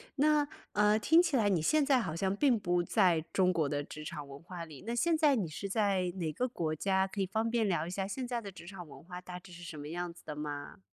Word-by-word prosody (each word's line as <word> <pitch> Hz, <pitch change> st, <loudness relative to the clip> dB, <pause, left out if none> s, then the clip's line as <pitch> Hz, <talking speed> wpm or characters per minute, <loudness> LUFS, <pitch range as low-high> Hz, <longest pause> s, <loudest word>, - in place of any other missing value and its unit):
那， 295 Hz, 0 st, +3 dB, 0.3 s
呃， 210 Hz, +1 st, +4 dB
听 325 Hz, +9 st, +6 dB
起 330 Hz, -7 st, +1 dB
来 210 Hz, -3 st, +3 dB
你 175 Hz, -5 st, +2 dB
现 300 Hz, -, +3 dB
在 270 Hz, -3 st, +4 dB
好 160 Hz, -8 st, -3 dB
像 190 Hz, +2 st, 0 dB
并 255 Hz, -2 st, +3 dB
不 175 Hz, -2 st, +1 dB
在 180 Hz, -4 st, +3 dB
中 185 Hz, -1 st, +3 dB
国 160 Hz, -4 st, +1 dB
的 145 Hz, 0 st, -1 dB
职 155 Hz, +1 st, -9 dB
场 150 Hz, -1 st, -6 dB
文 140 Hz, +2 st, -10 dB
化 175 Hz, 0 st, -7 dB
里， 155 Hz, -2 st, -12 dB
那 235 Hz, -, -2 dB
现 330 Hz, +8 st, +3 dB
在 295 Hz, -4 st, +5 dB
你 195 Hz, -8 st, 0 dB
是 195 Hz, +6 st, -5 dB
在 195 Hz, -4 st, +1 dB
哪 165 Hz, -4 st, -2 dB
个 250 Hz, -, 0 dB
国 160 Hz, -9 st, -2 dB
家？ 190 Hz, +3 st, +1 dB
可 195 Hz, +1 st, -4 dB
以 -, -, +2 dB
方 220 Hz, +4 st, -1 dB
便 230 Hz, -2 st, +1 dB
聊 170 Hz, -4 st, +1 dB
一 -, -, -5 dB
下 190 Hz, +1 st, -2 dB
现 250 Hz, +5 st, -4 dB
在 240 Hz, -1 st, -2 dB
的 200 Hz, -, -7 dB
职 180 Hz, -, -12 dB
场 180 Hz, -4 st, -8 dB
文 -, -, -13 dB
化 180 Hz, +1 st, -8 dB
大 180 Hz, 0 st, -8 dB
致 180 Hz, 0 st, -15 dB
是 175 Hz, 0 st, -10 dB
什 165 Hz, -2 st, -7 dB
么 145 Hz, 0 st, -7 dB
样 175 Hz, +1 st, -3 dB
子 175 Hz, -, -17 dB
的 150 Hz, -1 st, -5 dB
吗？ 145 Hz, -, -6 dB
185 Hz, 295 characters per minute, -32 LUFS, 165-225 Hz, 0.3 s, 听